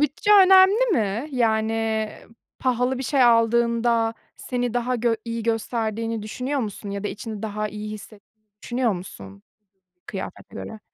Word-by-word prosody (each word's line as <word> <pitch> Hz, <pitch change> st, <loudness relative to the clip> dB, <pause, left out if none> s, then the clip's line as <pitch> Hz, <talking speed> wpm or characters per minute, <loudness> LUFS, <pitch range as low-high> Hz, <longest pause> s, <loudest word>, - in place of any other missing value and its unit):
bütçe 295 Hz, +8 st, 0 dB, 0.2 s
önemli 385 Hz, +5 st, +6 dB
mi? 225 Hz, -, -1 dB
Yani, 220 Hz, -2 st, 0 dB, 0.5 s
pahalı 250 Hz, 0 st, 0 dB
bir -, -, -3 dB
şey 270 Hz, +1 st, +2 dB
aldığında 235 Hz, -1 st, +3 dB, 0.2 s
seni 245 Hz, -2 st, -3 dB
daha 245 Hz, +1 st, 0 dB
gö 235 Hz, 0 st, +1 dB
iyi 230 Hz, -1 st, -4 dB
gösterdiğini 225 Hz, 0 st, -2 dB
düşünüyor 255 Hz, +6 st, -3 dB
musun 205 Hz, -3 st, -5 dB
ya 200 Hz, 0 st, -5 dB
da -, -, 0 dB
içini 215 Hz, -1 st, -7 dB
daha 215 Hz, 0 st, -3 dB
iyi 210 Hz, 0 st, -6 dB
hisse 215 Hz, 0 st, -10 dB, 0.4 s
düşünüyor 240 Hz, -2 st, 0 dB
musun 100 Hz, -, -9 dB, 0.6 s
kıyafete 190 Hz, -, -8 dB
göre? 220 Hz, -, -7 dB
230 Hz, 135 wpm, -23 LUFS, 215-245 Hz, 0.6 s, önemli